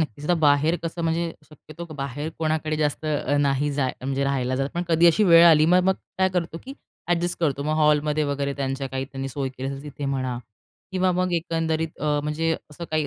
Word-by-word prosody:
नक्कीच, 150 -1 -4
तर 175 - +4
बाहेर 155 +1 +3
कसं, 165 +1 -4
म्हणजे 165 0 -1 0.2
शक्यतो 155 +2 -11
बाहेर 140 +2 -4
कोणाकडे 155 -1 -1
जास्त 150 0 -1
अ, 145 -1 0
नाही 140 +1 +1
जाय 135 -2 0
म्हणजे 135 +1 -1
राहायला 130 -2 0
जात, 135 +1 -1
पण 175 - -1
कधी 165 +1 +4
अशी 205 +6 +4
वेळ 170 -2 +8
आली, 155 -2 +6
मग 180 +2 +4
मग 190 - +3 0.2
काय 190 0 +4
करतो, 170 -3 -3
की 265 - -7 0.3
अ‍ॅडजस्ट 175 0 0
करतो 140 -3 0
मग 155 +1 -1
हॉलमध्ये 150 0 +2
वगैरे, 140 0 -1
त्यांच्या 135 0 -2
काही 130 +1 -3
त्यांनी 135 0 -6
सोय 135 0 -3
केली 130 +1 -6
असेल 140 0 -6
तिथे 145 -1 -7
म्हणा 130 -2 -2 0.5
किंवा 185 0 +2
मग 180 0 0
एकंदरीत 165 -1 -2
अ, 150 -1 +1
म्हणजे 160 +2 -1 0.2
असं 170 +3 -8
काही 155 -1 0
150 Hz, 205 wpm, -24 LUFS, 140-165 Hz, 0.5 s, वेळ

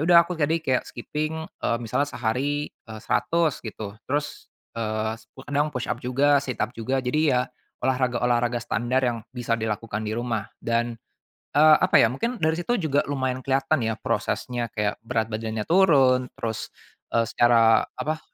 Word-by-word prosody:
udah 170 +1 +7
aku - - -5
jadi 160 -1 +1
kayak 130 -1 +2
skipping, 155 +6 -4
eee, 115 - -2
misalnya 120 +5 -1
sehari, 145 +5 -2 0.2
eh, 110 -1 -8
100 165 -4 +1
gitu. 110 -3 -7 0.2
Terus, 145 +2 -3 0.2
eee, 110 -1 -2 0.3
kadang 145 +1 0
push-up 125 -3 -3
juga, 140 +3 +3
sit-up 125 -3 -3
juga, 130 +3 -2
jadi 140 +5 +1
ya 125 -1 +3 0.4
olahraga-olahraga 125 -2 +1
standar 125 +4 0
yang 120 -2 0
bisa 120 -2 -1
dilakukan 110 -1 -3
di 105 - -2
rumah 115 -3 -3
dan, 115 0 -1 0.6
eee, 155 +1 +8
apa 185 - +2
ya, 115 - +5
mungkin 235 - -2
dari 160 +2 +2
situ 240 +8 0
juga 155 - 0
lumayan 130 -2 -1
kelihatan 135 +2 +1
ya 110 - -1
prosesnya 120 -1 -2
kayak 105 -1 -1
berat 115 -1 -2
badannya 110 0 -3
turun, 135 -9 +4
terus, 110 -1 -3 0.5
eee, 115 - +4
secara 115 0 +4
apa, 155 +1 -2
125 Hz, 155 wpm, -25 LUFS, 115-145 Hz, 0.6 s, eee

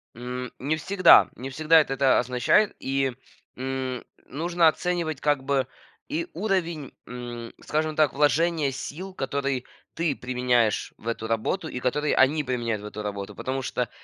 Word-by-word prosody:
М, 125 +1 -5
не 145 +4 0
всегда, 185 +2 +6
не 130 +2 -6
всегда 155 +4 +5
это 135 - -2
это 135 -1 +4
означает. 125 - +2
И, 135 -1 0 0.4
м, 130 -1 -3 0.2
нужно 170 +4 +2
оценивать 165 -3 0
как 145 -3 +1
бы 135 -1 +1 0.4
и 330 +4 -2
уровень, 170 -8 -1 0.2
м, 120 -1 -7
скажем 155 0 -1
так, 155 -3 +3
вложения 150 +1 +2
сил, 180 +8 -6
которые 140 -3 -2 0.3
ты 165 -4 0
применяешь 125 -3 +1
в 115 - -12
эту 115 -1 -2
работу 115 - -1
и 125 - -5
которые 150 +4 0
они 150 +3 +4
применяют 120 -5 -2
в - - -9
эту 105 0 -6
работу. 100 -1 -5
Потому 135 +1 -3
что, 125 -2 -2
135 Hz, 155 wpm, -26 LUFS, 125-155 Hz, 0.4 s, всегда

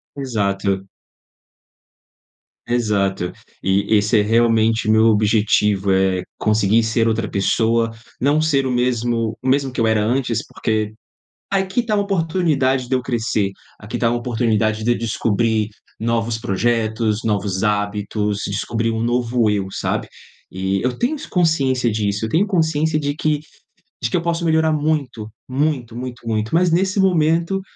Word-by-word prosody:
Exato. 100 -7 -1 1.8
Exato. 100 -6 0 0.3
E 100 +3 +2
esse 105 +1 +3
é - - +4
realmente 115 0 +2
meu 110 +1 +5
objetivo, 105 -2 +2
é 95 -1 +2
conseguir 110 +1 +2
ser 115 +1 +1
outra 110 -1 0
pessoa, 115 +3 +1 0.3
não 145 +3 +3
ser 145 -4 +2
o - - -1
mesmo 120 -2 0
o 130 - -5
mesmo 135 -1 +2
que - - -6
eu 110 - +3
era 110 -1 +2
antes. 120 +2 0
Porque 110 -2 -2 0.6
aqui 195 +4 0
tá 215 -2 0
uma 205 - +1
oportunidade 160 -9 0
de 130 - +2
eu 125 - 0
crescer, 115 -5 -1 0.3
aqui 110 +3 -5
tá 115 -1 +2
uma 120 - 0
oportunidade 110 -3 0
de 120 - +2
eu 120 - +1
descobrir 110 -1 0 0.3
novos 115 0 -1
projetos, 110 +1 0
novos 100 -3 -1
hábitos, 105 0 -1
descobrir 115 +3 -1
um 110 0 -2
novo 120 -1 +1
eu, 100 -2 0
sabe? - - -2 0.4
E 95 +1 -1
eu 125 0 -1
tenho 255 +6 0
esse 300 - -8
consciência 135 - +1
disso, 105 0 -1
eu - - -4
tenho 185 - +2
consciência 160 -4 +1
de 145 -1 -2
que 155 -1 0 0.6
de 120 - -1
que - - +2
eu - - -1
posso 170 0 -1
melhorar 160 0 +3
muito, 145 -8 -1 0.2
muito, 130 -4 -1
muito, 125 0 -6
muito! 110 +1 -1
Mas 175 +1 +4
nesse 190 +3 +1
momento 170 +1 +2
115 Hz, 150 wpm, -20 LUFS, 105-140 Hz, 1.8 s, meu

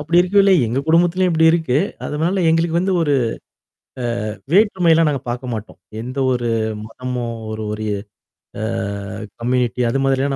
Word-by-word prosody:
அப்டி 160 +4 0
இருக்கேல்ல, 195 +2 +4
எங்க 120 +4 -1
குடும்பத்துலயும் 175 +3 +3
இப்டி 160 0 +4
இருக்கு, 160 -5 +1 0.3
அதுனால 170 +5 0
எங்களுக்கு 165 +1 +2
வந்து 190 +2 0
ஒரு 145 -3 +2 1.2
அ - - -3 0.2
வேற்றுமைலாம் 180 -6 +4
நாங்க 140 -3 -2
பாக்க 125 +2 -4
மாட்டோம். 110 -1 -7 0.2
எந்த 130 +3 -7
ஒரு 120 -1 -1 0.4
மதமோ 125 +2 -5 0.3
ஒரு 110 0 -4
ஒரு 110 0 -4 0.8
அ - - -2 0.8
கம்யூனிட்டி 125 0 0
அது 135 +4 0
மாதிரிலாம் 135 +1 +1
145 Hz, 140 wpm, -19 LUFS, 125-170 Hz, 1.2 s, இருக்கேல்ல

